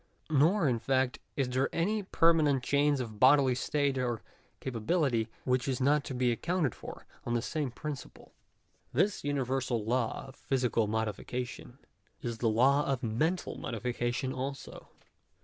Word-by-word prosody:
Nor 160 +5 +4
in 120 -3 +1
fact, 130 +1 0 0.2
is 135 -3 +1
there 130 +2 0
any 210 +6 0
permanent 160 -8 +3
change 145 +1 +2
of 110 -4 -5
bodily 130 0 +6
state 140 +1 0
or 120 -3 -2 0.4
capability, 125 -1 0 0.2
which 125 0 +1
is 130 -2 -1
not 140 +2 +3
to 130 - -5
be 125 -1 +2
ac 115 - -2
counted 170 -7 0
for - - -10 0.2
on 120 - -1
the 120 - +1
same 150 -2 -2
principle. 145 +3 -8 0.6
This 205 0 +1
universal 130 -5 -1
law 120 0 -1
of 135 - -12
physical 125 -5 0
modification, 110 +3 -4 0.4
is 115 -3 -4
the 115 - +2
law 135 +6 +4
of 135 -1 -1
mental 150 +10 -1
modification 120 +2 -2
also. 135 +1 -6
130 Hz, 150 wpm, -31 LUFS, 120-145 Hz, 0.6 s, bodily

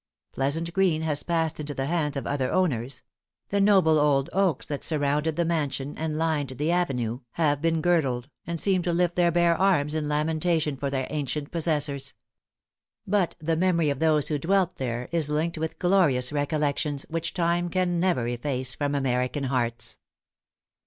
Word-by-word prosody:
Pleasant 160 +5 -1
Green 175 -4 +2
has 150 -2 +1
passed 165 -2 -1
into 145 -1 -5
the 135 - -2
hands 150 -2 -1
of 135 - -4
other 135 -3 -1
owners; 135 -9 0 0.5
the 200 0 +1
noble 190 -6 +5
old 140 -2 +2
oaks 190 -7 +1
that 145 -2 -4
surrounded 150 +1 0
the 170 - +1
mansion 145 -4 -2
and 155 -1 -3
lined 155 -4 0
the 150 +5 -1
avenue, 125 -10 0
have 145 -3 +1
been 165 -1 +1
girdled, 135 -8 +1 0.2
and 170 -1 0
seem 190 0 +2
to 175 0 -1
lift 175 0 +1
their 175 -1 +3
bare 170 0 +3
arms 170 -7 +2
in 155 -1 -1
lamentation 155 0 0
for 140 +1 -3
their 135 -1 -1
ancient 145 0 -3
possessors. 145 -5 -1 0.9
But 195 -3 +1
the 165 +1 -1
memory 170 -3 +2
of 140 - -4
those 155 -2 +3
who 150 -2 0
dwelt 185 +3 +1
there 125 -1 -3
is 165 -3 +1
linked 155 +2 -1
with 160 0 -3
glorious 150 -9 +2
recollections, 145 -1 -1
which 165 0 -3
time 175 0 +1
can 175 -1 0
never 170 -10 +1
efface 125 +1 -1
from 145 -1 -1
American 130 +1 0
hearts. 120 -3 -2
155 Hz, 170 wpm, -26 LUFS, 140-170 Hz, 0.9 s, noble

